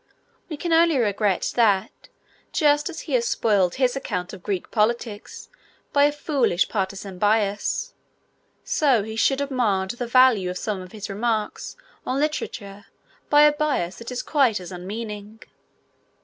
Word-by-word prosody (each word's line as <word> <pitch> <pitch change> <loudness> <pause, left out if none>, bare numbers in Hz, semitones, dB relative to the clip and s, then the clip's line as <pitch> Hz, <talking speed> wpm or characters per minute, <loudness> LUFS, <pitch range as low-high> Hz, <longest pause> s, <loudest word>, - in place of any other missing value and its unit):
We 310 - -5
can 340 +2 -1
only 330 -2 +4
regret 205 -4 0
that, 205 -5 +1 0.4
just 295 +1 +2
as 335 -1 -7
he 295 - -6
has 235 -2 +2
spoiled 195 -6 +1
his 255 -1 +1
account 180 -9 -4
of 190 - -9
Greek 190 -1 -4
politics 220 -1 -2 0.5
by 285 0 +5
a 295 - +3
foolish 280 - 0
partisan 195 -2 -4
bias, 210 - 0 0.7
so 265 -8 +2
he 220 +1 -6
should 270 +4 +2
have 280 0 -3
marred 200 -7 0
the 240 0 -5
value 245 -6 +4
of 180 - -4
some 200 -1 -3
of 185 0 -11
his 210 -1 -7
remarks 215 +1 -2 0.3
on 260 +2 -2
literature 205 -9 -3 0.4
by 295 0 +6
a 300 - +7
bias 295 - -1
that 230 - -8
is 250 - -3
quite 265 -9 +2
as 180 0 -9
unmeaning. 210 +3 -7
225 Hz, 155 wpm, -23 LUFS, 200-270 Hz, 0.7 s, a